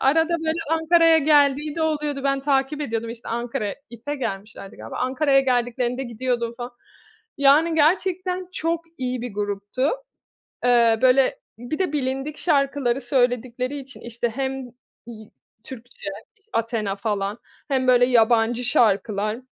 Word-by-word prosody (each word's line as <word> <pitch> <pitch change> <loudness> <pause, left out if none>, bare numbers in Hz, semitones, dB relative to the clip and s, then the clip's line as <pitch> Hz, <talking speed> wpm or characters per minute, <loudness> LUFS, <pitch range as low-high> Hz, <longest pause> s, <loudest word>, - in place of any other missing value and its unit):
arada, 325 +5 +3
böyle, 320 0 -1
Ankara'ya 325 0 +5
geldiği 290 0 +3
de 330 - -2
oluyordu. 300 -3 -1
Ben 275 0 +1
takip 275 +1 0
ediyordum, 230 -4 -3
işte, 235 0 -9
Ankara'ya, 230 -3 -3 0.2
IF'e 235 +5 -5
gelmişlerdi 200 -4 -6
galiba. - - -8
Ankara'ya 270 +2 +2
geldiklerinde 245 0 0
gidiyordum 235 -1 -2
falan. 240 0 -6 0.7
Yani, 295 +4 +5
gerçekten 365 +3 +1
çok 335 0 -2
iyi 255 -1 -2
bir 245 -4 -6
gruptu. 205 +6 -1 0.7
Eee, 235 -2 +4
böyle, 260 +1 +4 0.2
bir 245 +6 -5
de 370 -5 0
bilindik 270 +1 -2
şarkıları 275 -5 +1
söyledikleri 250 +1 0
için, 270 +1 -12
işte, 235 0 -3
hem, 265 +1 -3 0.4
iii, 220 -3 -11 0.3
Türkçe, 245 -5 -9 0.3
iş 405 - -41
Athena 225 - -1
falan 205 0 -2 0.3
hem, 265 -2 0
böyle, 245 -1 +6
yabancı 235 0 +3
şarkılar. 215 -1 +1
255 Hz, 130 wpm, -23 LUFS, 235-290 Hz, 0.7 s, böyle